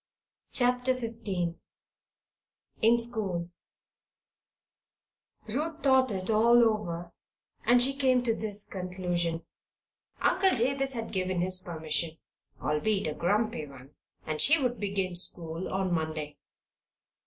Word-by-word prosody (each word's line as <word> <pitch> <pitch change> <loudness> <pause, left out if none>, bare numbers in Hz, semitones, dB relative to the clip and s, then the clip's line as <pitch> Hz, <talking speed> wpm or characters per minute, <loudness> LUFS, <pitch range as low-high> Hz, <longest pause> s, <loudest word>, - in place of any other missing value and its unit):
CHAPTER 250 0 +3
XV 220 -8 -3 1.3
IN 230 +2 +5
SCHOOL 205 -8 -1 2.0
Ruth 305 +7 -3
thought 265 -2 +4
it 190 0 -2
all 235 +2 +5
over, 175 -6 -1 0.5
and 245 +1 +6
she 270 +3 +6
came 260 -3 +2
to 230 -2 +2
this 210 -2 -3
conclusion: 180 -3 -3 0.7
Uncle 380 -6 +3
Jabez 270 +3 0
had 230 -2 -5
given 185 -2 -1
his 185 +1 +1
permission 160 -3 -3 0.4
albeit 190 +9 0
a 155 - -1
grumpy 205 -2 0
one 135 0 -14 0.3
and 155 -1 -1
she 320 +3 +5
would 250 -3 -1
begin 195 -3 -2
school 170 -1 -1
on 190 -1 -1
Monday. 155 -2 -3
200 Hz, 110 wpm, -29 LUFS, 170-240 Hz, 2.0 s, and